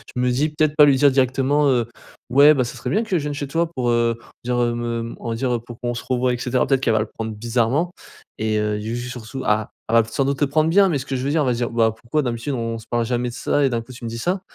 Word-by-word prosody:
je 125 - -1
me 125 - +2
dis 135 +5 +1
peut-être 150 0 0
pas 150 - +8
lui 140 -2 +5
dire 140 +2 +5
directement, 135 +2 +2
heu: 120 -4 +2 0.4
«Ouais, 140 +4 +7
bah, 135 -4 +1
ça 115 - -7
serait - - -4
bien 215 - +2
que 220 - -11
je 155 - -3
vienne 145 0 -3
chez 145 0 -4
toi 165 +3 -1
pour, 125 -6 -1
heu, 120 -1 +2
on - - -21
va - - -19
dire, 125 0 -1
heu, 120 -1 +1
me 115 -1 -3
on - - -5
va 115 - -1
dire, 125 +2 -1
heu, - - -2
pour 120 +1 -12
qu'on 120 0 -2
se 120 - -5
revoie 125 0 +1
et - - -2
cetera». 125 +1 0
Peut-être 135 -2 +2
qu'elle 120 - +2
va 110 - +3
le 110 - 0
prendre 110 +1 -6
bizarrement 120 +9 0 0.5
et 110 0 0
heu, 105 0 -1
j 110 +2 -4
ju 120 +1 -5
surtout 125 +1 -7
ah, 105 0 +1 0.2
elle - - -1
va 115 - +7
peut-être 115 +1 -12
sans 135 - +2
doute 140 +1 -1
le 145 - +4
prendre 155 +3 +2
bien, 195 +3 +5
mais 155 - +1
ce 135 - -6
que 135 - -3
je 125 - -3
veux 140 - -1
dire 155 +3 +1
elle 140 - +1
va 125 - +2
dire: 120 0 -2
«Bah, 115 -1 +2
pourquoi 120 +7 -1
d'habitude, 120 0 -3
on 115 -2 -3
se - - -13
parle 120 -1 0
jamais 120 +1 -1
de - - -9
ça 145 +3 0
et 135 - +3
d'un 120 -2 -1
coup, 125 +3 -12
tu 125 - -12
me 115 - -3
dis 115 - -6
ça?». 180 +10 -1
125 Hz, 335 wpm, -21 LUFS, 115-140 Hz, 0.5 s, pas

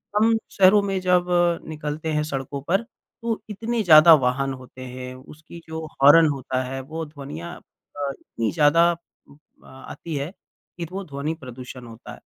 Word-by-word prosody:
हम 225 +1 +4
शहरों 195 +1 +5
में 195 -1 -1
जब 180 -1 +3 0.4
निकलते 155 0 -4
हैं 150 0 +1
सड़कों 140 -1 -4
पर 195 +5 +2
तो 230 -1 -7
इतने 225 +3 -2
ज़्यादा 160 -1 +9
वाहन 135 -1 +1
होते 130 0 -12
हैं, 125 0 -7
उसकी 155 +5 -13
जो 160 0 -5 0.2
हॉर्न 155 +3 +8
होता 130 -2 -2
है, 135 +1 -5
वो 160 +4 -6
ध्वनियाँ 135 - -8
अ, 145 -1 -8
इतनी 115 -1 -3
ज़्यादा 165 +2 +4
अ, 160 -3 -15
आती 140 +4 -8
है 140 +5 -3 0.5
कि 170 - -4
वो 195 +1 -4
ध्वनि 145 +1 -3
प्रदूषण 125 0 -9
होता 115 0 -11
है। - - -13
150 Hz, 160 wpm, -23 LUFS, 135-170 Hz, 0.5 s, ज़्यादा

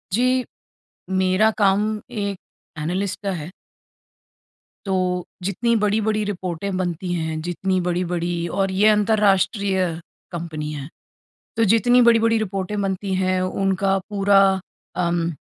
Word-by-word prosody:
जी। 240 - +2 1.0
मेरा 190 +4 +3
काम 200 -1 +3 0.4
एक 200 -1 -2 0.4
एनालिस्ट 180 +6 -2
का 200 - -1
है। 165 +5 -9 1.3
तो 185 -2 0 0.2
जितनी 225 +5 0
बड़ी-बड़ी 215 0 +1
रिपोर्टें 190 -1 -3
बनती 180 0 -2
हैं, 160 -2 -2
जितनी 185 +3 -1
बड़ी-बड़ी 175 -1 -1
और 195 -1 +1
ये 195 +3 +3
अंतर्राष्ट्रीय 200 -2 +2 0.5
कंपनी 160 -3 -5
हैं। 140 0 -6 0.7
तो 230 - +3
जितनी 245 +2 +4
बड़ी-बड़ी 230 -1 +4
रिपोर्टें 200 0 -2
बनती 195 0 -2
हैं 185 0 +1
उनका 195 +1 0
पूरा 200 -1 +4 0.7
उम, 170 0 0
190 Hz, 115 wpm, -22 LUFS, 180-205 Hz, 1.3 s, जितनी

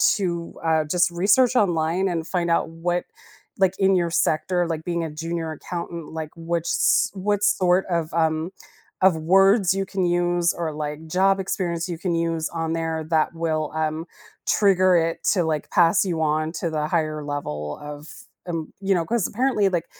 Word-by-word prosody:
to, 170 -4 -3
uh, 160 -1 +2
just 175 +3 +2
research 210 +9 +3
online 175 -2 +2
and 165 -3 -2
find 175 -2 -1
out 165 - +1
what, 175 +2 -2 0.6
like 190 0 +2
in 190 0 +3
your 170 -2 +1
sector, 175 +2 +1
like 160 -1 -3
being 170 -1 -2
a 160 - -4
junior 165 +1 -4
accountant, 170 0 -6
like 160 -1 -5
which 165 0 -2
s - - +2
what 205 +1 -1
sort 185 -2 +3
of, 170 -3 -1
um, 160 0 +1 0.5
of 190 -3 +5
words 195 +4 +4
you 195 0 -1
can 190 -1 -1
use 175 0 +1
or, 165 -3 -3
like, 150 +1 -5
job 195 +3 +2
experience 175 -2 -2
you 170 - -4
can 175 -1 -1
use 165 -1 -1
on 165 -1 -3
there 165 -1 -2
that 160 +1 +2
will, 155 -2 -1
um, 160 +1 -2 0.4
trigger 185 -3 +4
it 165 0 +1
to, 180 -4 +1
like, 155 -2 -2
pass 175 +3 +4
you 170 -3 -2
on 155 +1 0
to 170 - -2
the 150 -1 -1
higher 155 -2 -1
level 75 - -4
of, 150 +1 -8 0.4
um 165 -2 -4
you 195 0 +2
know, 170 - +1
'cause 230 -5 0
apparently, 235 -3 +1
like, 175 -3 -1
170 Hz, 180 wpm, -23 LUFS, 160-185 Hz, 0.6 s, of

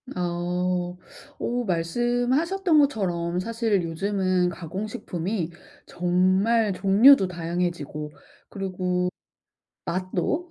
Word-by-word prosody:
어. 180 0 -1 0.4
어 245 +1 -1
말씀하셨던 245 - +1
것처럼 180 -10 0
사실 225 -2 0
요즘은 185 +1 0
가공식품이 175 0 -4 0.4
정말 185 +5 +2
종류도 195 +4 +6
다양해지고 170 -3 -3 0.4
그리고 180 -2 -2 0.8
맛도, 185 - -2
185 Hz, 200 characters per minute, -25 LUFS, 175-220 Hz, 0.8 s, 종류도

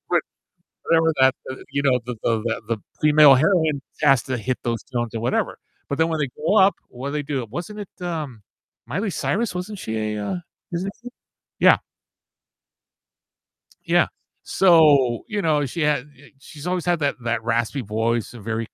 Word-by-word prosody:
what - - +2 0.6
whatever 165 -1 +3
that, 130 0 +5 0.2
uh, - - -6 0.2
you 140 0 0
know, 130 -2 +3
the 125 -1 -4
the 115 -1 +2
the 115 - -1
the - - -13 0.2
female 150 -2 +7
heroine 155 -2 +2 0.2
has 135 -5 +4
to 130 -2 -3
hit 125 +3 -2
those 115 -1 -1
notes 120 -1 -2
or - - -1
whatever. 120 +2 -1 0.3
But 140 - -2
then 160 - +3
when 160 -2 -2
they 145 - -1
grow 160 +8 +1
up, 195 0 +5
what 130 +3 -6
do - - -6
they 150 -1 -1
do? 135 -4 -3
Wasn't 195 +9 -6
it, 200 -2 -10
um, 155 -11 -5 0.4
Miley 200 +1 -2
Cyrus, 215 +3 -1
wasn't 185 +3 -5
she 110 -7 -4
a 110 0 -2
a 175 - -4 0.3
Disney 180 +3 -2
kid? 245 - -9 0.5
Yeah. - - +7 2.1
Yeah, - - +3 0.4
so, 150 -10 +4
you 210 -3 -2
know, 150 -4 +2
she 160 +6 -4
had, 150 -3 +1
uh 145 -1 -19
she's 145 +3 -10
always 180 -1 -1
had 175 -1 +1
that 145 -2 0
that 120 -1 -1
raspy 115 +4 0
voice, 115 +2 -1
a 120 - -10
very 110 +1 -3
145 Hz, 185 wpm, -22 LUFS, 120-170 Hz, 2.1 s, female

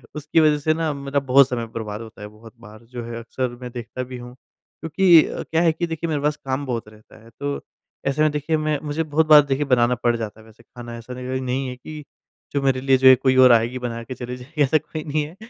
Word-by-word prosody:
उसकी 150 +2 0
वज़ह 155 -2 +4
से 155 +2 +1
ना 160 -1 -1
मेरा 140 0 -2
बहुत 135 0 +4
समय 120 -2 -3
बर्बाद 105 -1 -5
होता 110 -2 -12
है। 105 - -7
बहुत 110 +2 -15
बार 110 0 -14
जो 120 0 -8
है 115 0 -6
अक्सर 125 +2 -3
मैं 125 -1 -7
देखता 120 +1 -6
भी 125 0 -8
हूँ। 125 0 -10
क्योंकि 165 +5 +2
अ, - - -5
क्या 165 +1 0
है 165 -2 +4
कि 170 +2 -3
देखिए 165 0 -4
मेरे 145 -2 -1
पास 150 0 0
काम 135 +2 -2
बहुत 120 -4 -4
रहता 110 +1 -18
है। 115 - -16
तो 140 0 -3 0.5
ऐसे 140 +2 0
में 155 -1 +3
देखिए 150 +2 -1
मैं 155 -2 -1
मुझे 150 +2 -2
बहुत 155 +1 +1
बार 150 -1 +9
देखिए 140 +1 -1
बनाना 125 -2 +3
पड़ 120 -1 +3
जाता 110 -1 -6
है 110 - -16
वैसे 110 +1 -19
ख़ाना। 120 0 -10
ऐसा 115 +2 -9
लग 130 +1 -4
नहीं 130 +1 -2
है 125 - -6
कि 150 +4 -10 0.5
जो 140 - 0
मेरे 130 -1 +1
लिए 135 -1 +3
जो 130 0 +4
है 130 - +10
कोई 130 +1 +1
और 125 - +7
आएगी 120 +2 +2
बना 115 -1 -4
के 130 - -7
चले 125 0 -6
जाएगी। 145 +5 -6
ऐसा 145 +3 +3
कोई 155 0 -7
नहीं 150 0 -1
है 160 +4 -12
130 Hz, 260 wpm, -22 LUFS, 120-150 Hz, 0.5 s, है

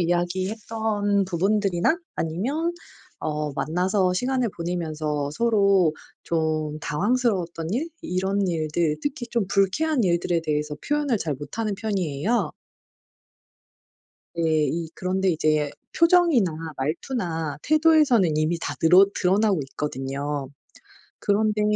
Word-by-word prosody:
이야기했던 200 +4 0
부분들이나 195 - +1 0.2
아니면 260 - -1 0.5
어 150 -1 -2
만나서 180 +5 +1
시간을 250 +4 0
보내면서 155 -4 -2
서로 200 -5 +3 0.3
좀 155 -2 -1
당황스러웠던 180 - 0
일 285 +9 -1
이런 190 +2 -1
일들 160 -1 0
특히 280 -4 -3
좀 230 -4 0
불쾌한 240 +10 +2
일들에 170 -1 +1
대해서 150 0 -1
표현을 295 -5 +1
잘 160 -5 -2
못하는 200 - -4
편이에요. 195 0 -1 1.8
네 160 -2 +2
이 165 +3 -3
그런데 190 +1 -1
이제 155 -2 +1 0.3
표정이나 335 - +4 0.2
말투나 160 - -3
태도에서는 300 - +4
이미 155 +2 +1
다 - - -3
느럿 185 +4 +6
드러나고 195 0 +2
있거든요. 140 0 -3 0.7
그런데 210 +1 +1
180 Hz, 265 characters per minute, -24 LUFS, 155-220 Hz, 1.8 s, 느럿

